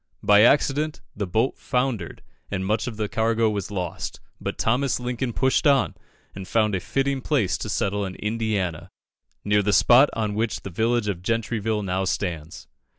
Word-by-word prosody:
By 105 Hz, 0 st, +6 dB
accident, 145 Hz, +5 st, +3 dB, 0.2 s
the 100 Hz, -1 st, -3 dB
boat 110 Hz, +8 st, 0 dB
foundered, 125 Hz, -9 st, -2 dB, 0.3 s
and 95 Hz, -2 st, -2 dB
much 105 Hz, +4 st, 0 dB
of 115 Hz, -4 st, -5 dB
the 105 Hz, -1 st, -1 dB
cargo 110 Hz, +1 st, +1 dB
was 100 Hz, -3 st, -3 dB
lost; 90 Hz, -4 st, -4 dB, 0.2 s
but -, -, -4 dB
Thomas 125 Hz, +3 st, +1 dB
Lincoln 125 Hz, 0 st, -2 dB
pushed 130 Hz, +5 st, +2 dB
on, 140 Hz, -2 st, +3 dB, 0.4 s
and 95 Hz, -1 st, -8 dB
found 110 Hz, -2 st, +2 dB
a 95 Hz, -, +1 dB
fitting 135 Hz, +8 st, -1 dB
place 125 Hz, -, +1 dB
to -, -, -5 dB
settle 100 Hz, +1 st, -1 dB
in 95 Hz, -, -6 dB
Indiana, 105 Hz, -6 st, -2 dB, 0.6 s
near 105 Hz, 0 st, +3 dB
the 105 Hz, +1 st, +1 dB
spot 125 Hz, +7 st, +6 dB
on 110 Hz, -2 st, -1 dB
which 110 Hz, +1 st, -1 dB
the 95 Hz, -, -7 dB
village 115 Hz, +4 st, +1 dB
of 95 Hz, -4 st, -2 dB
Gentryville 110 Hz, 0 st, -1 dB
now 95 Hz, 0 st, -1 dB
stands. 85 Hz, -4 st, -4 dB
110 Hz, 170 wpm, -24 LUFS, 100-120 Hz, 0.6 s, By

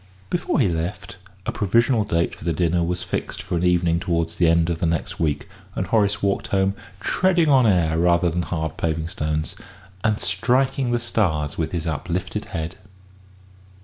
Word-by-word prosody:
Before 175 Hz, -2 st, 0 dB
he 120 Hz, -, +4 dB
left, 90 Hz, +3 st, -3 dB, 0.3 s
a -, -, -1 dB
provisional 115 Hz, +3 st, +2 dB
date 85 Hz, -5 st, 0 dB
for -, -, -11 dB
the 85 Hz, 0 st, 0 dB
dinner 85 Hz, +1 st, +1 dB
was 90 Hz, +1 st, -2 dB
fixed -, -, -4 dB
for -, -, -3 dB
an 85 Hz, -, 0 dB
evening 85 Hz, -1 st, +3 dB
towards 85 Hz, -1 st, -1 dB
the 85 Hz, -, +5 dB
end 85 Hz, +1 st, +3 dB
of 80 Hz, -, -3 dB
the 85 Hz, -, +1 dB
next 90 Hz, +4 st, -2 dB
week, 75 Hz, -4 st, -1 dB, 0.3 s
and 95 Hz, -, -1 dB
Horace 100 Hz, +1 st, +1 dB
walked 100 Hz, -1 st, 0 dB
home, 95 Hz, 0 st, +1 dB, 0.3 s
treading 175 Hz, -, +2 dB
on 130 Hz, -4 st, +5 dB
air 80 Hz, -5 st, +2 dB
rather 85 Hz, +1 st, +3 dB
than 85 Hz, +1 st, 0 dB
hard 80 Hz, -2 st, -3 dB
paving 80 Hz, 0 st, -1 dB
stones, 75 Hz, -1 st, -2 dB, 0.5 s
and 110 Hz, -1 st, +2 dB
"striking 130 Hz, +6 st, +1 dB
the 120 Hz, -, +2 dB
stars 90 Hz, -11 st, 0 dB
with 80 Hz, -, -2 dB
his 85 Hz, -2 st, -2 dB
uplifted 80 Hz, -3 st, -3 dB
head." 80 Hz, +3 st, -5 dB
90 Hz, 180 wpm, -23 LUFS, 80-105 Hz, 0.5 s, the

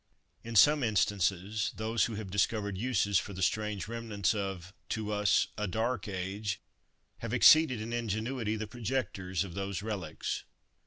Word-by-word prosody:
In 115 Hz, 0 st, -6 dB
some 145 Hz, +7 st, +7 dB
instances, 100 Hz, -2 st, +1 dB
those 110 Hz, 0 st, +1 dB
who 115 Hz, -, -4 dB
have 105 Hz, -3 st, -6 dB
discovered 100 Hz, 0 st, 0 dB
uses 100 Hz, -3 st, +2 dB
for 100 Hz, -, -7 dB
the 95 Hz, 0 st, -3 dB
strange 105 Hz, 0 st, -1 dB
remnants 115 Hz, -5 st, -1 dB
of, 95 Hz, -3 st, -4 dB, 0.2 s
to 110 Hz, -1 st, -2 dB
us, 105 Hz, 0 st, +2 dB
a 105 Hz, -, -1 dB
dark 110 Hz, +2 st, -1 dB
age, 95 Hz, +1 st, -3 dB, 0.6 s
have 115 Hz, +1 st, -3 dB
exceeded 140 Hz, -1 st, +7 dB
in 115 Hz, +2 st, -5 dB
ingenuity 115 Hz, 0 st, -2 dB
the 110 Hz, 0 st, -3 dB
projectors 105 Hz, -6 st, -2 dB
of 95 Hz, -3 st, -8 dB
those 100 Hz, +1 st, -3 dB
relics. 105 Hz, -5 st, -4 dB
105 Hz, 150 wpm, -31 LUFS, 100-115 Hz, 0.6 s, some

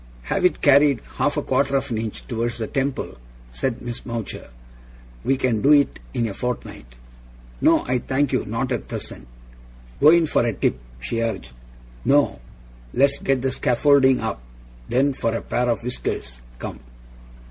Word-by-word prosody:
'Have -, -, -1 dB
it 180 Hz, -, +2 dB
carried 140 Hz, -2 st, +5 dB, 0.2 s
half 145 Hz, -, +1 dB
a 145 Hz, -, 0 dB
quarter 135 Hz, +1 st, +1 dB
of 135 Hz, -, 0 dB
an 110 Hz, -, -1 dB
inch 110 Hz, -1 st, -5 dB
towards 120 Hz, 0 st, -2 dB
the 115 Hz, -, -2 dB
temple,' 135 Hz, -, -3 dB, 0.3 s
said 115 Hz, -, -3 dB
Miss 120 Hz, -1 st, -6 dB
Mowcher. 115 Hz, -4 st, -5 dB, 0.7 s
'We 135 Hz, -, +2 dB
can 120 Hz, -5 st, 0 dB
do 145 Hz, +2 st, +6 dB
it 145 Hz, -2 st, +3 dB
in 115 Hz, -, -1 dB
a 100 Hz, -, -5 dB
fortnight.' 95 Hz, -, -5 dB, 0.7 s
'No, -, -, +4 dB
I 125 Hz, 0 st, +1 dB
thank 135 Hz, +3 st, 0 dB
you. -, -, +1 dB
Not -, -, -2 dB
at -, -, -2 dB
present.' 60 Hz, -, -7 dB, 0.7 s
'Go 150 Hz, -, +7 dB
in 170 Hz, 0 st, +6 dB
for 150 Hz, -, +2 dB
a 115 Hz, -1 st, 0 dB
tip,' 65 Hz, -, 0 dB, 0.2 s
she 115 Hz, -, -2 dB
urged. 105 Hz, -, -3 dB, 0.5 s
'No? 140 Hz, -, +3 dB, 0.6 s
Let's 140 Hz, +1 st, +3 dB
get 135 Hz, -2 st, 0 dB
the 135 Hz, -, +1 dB
scaffolding 130 Hz, +1 st, +3 dB
up, 110 Hz, -, -3 dB, 0.5 s
then, 135 Hz, +3 st, +2 dB
for 115 Hz, -3 st, -1 dB
a -, -, -2 dB
pair 125 Hz, 0 st, 0 dB
of 115 Hz, -1 st, 0 dB
whiskers. -, -, -4 dB, 0.2 s
Come! 65 Hz, -, -6 dB
125 Hz, 170 wpm, -23 LUFS, 115-140 Hz, 0.7 s, Go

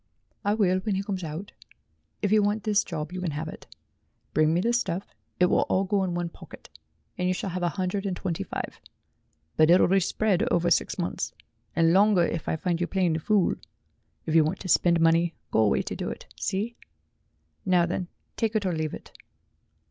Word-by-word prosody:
"I 205 Hz, +1 st, +2 dB
will 185 Hz, -4 st, +2 dB
when 200 Hz, +1 st, -1 dB
he 195 Hz, -, -1 dB
comes 195 Hz, -3 st, -4 dB
out. 160 Hz, +5 st, -6 dB, 0.7 s
If 205 Hz, -, +1 dB
you 215 Hz, 0 st, +5 dB
want 205 Hz, +1 st, 0 dB
this 210 Hz, -2 st, +2 dB
job, 155 Hz, -2 st, -5 dB
you 185 Hz, 0 st, -5 dB
can 180 Hz, -, -1 dB
have 155 Hz, +1 st, -3 dB
it. -, -, -10 dB, 0.7 s
Bring 155 Hz, 0 st, +3 dB
me 170 Hz, -, +2 dB
the 235 Hz, +6 st, +1 dB
stuff 200 Hz, -6 st, -1 dB, 0.3 s
it 180 Hz, -, +6 dB
will -, -, +3 dB
all 190 Hz, -, +2 dB
go 195 Hz, 0 st, +1 dB
in 180 Hz, -2 st, -2 dB
one 175 Hz, -1 st, -2 dB
pocket -, -, -13 dB, 0.5 s
and 180 Hz, -, +1 dB
you 185 Hz, -, +1 dB
shall 190 Hz, -, -3 dB
have 180 Hz, +1 st, -3 dB
a 175 Hz, -, +2 dB
hundred 195 Hz, +2 st, -1 dB
and 185 Hz, -2 st, -2 dB
twenty 175 Hz, -4 st, -3 dB
five, -, -, -6 dB, 0.8 s
but 155 Hz, 0 st, +5 dB
it'll 180 Hz, +2 st, +6 dB
be 195 Hz, +2 st, +4 dB
spread 195 Hz, +1 st, +1 dB
over 175 Hz, -5 st, +2 dB
six -, -, +2 dB
months, -, -, -3 dB, 0.4 s
and 165 Hz, 0 st, +4 dB
longer 200 Hz, -2 st, +5 dB
if 165 Hz, -, -3 dB
I -, -, +1 dB
find 170 Hz, +1 st, -1 dB
you 175 Hz, -, +1 dB
playing 185 Hz, -3 st, +1 dB
the 160 Hz, -, -1 dB
fool. 200 Hz, +3 st, +2 dB, 0.7 s
If 155 Hz, -, -2 dB
you 160 Hz, -1 st, +6 dB
want 155 Hz, -, -2 dB
to -, -, -6 dB
spend 170 Hz, -1 st, +4 dB
money, 165 Hz, +1 st, +3 dB, 0.2 s
go -, -, +2 dB
away 110 Hz, -2 st, +3 dB
to -, -, -5 dB
do -, -, -3 dB
it. -, -, -7 dB
See? 210 Hz, -, -2 dB, 0.9 s
Now 180 Hz, -2 st, +3 dB
then 180 Hz, +1 st, -3 dB, 0.3 s
take 225 Hz, -1 st, 0 dB
it 210 Hz, -2 st, +1 dB
or 185 Hz, -, 0 dB
leave 155 Hz, -1 st, -2 dB
it." -, -, -14 dB
180 Hz, 210 wpm, -26 LUFS, 170-200 Hz, 0.9 s, it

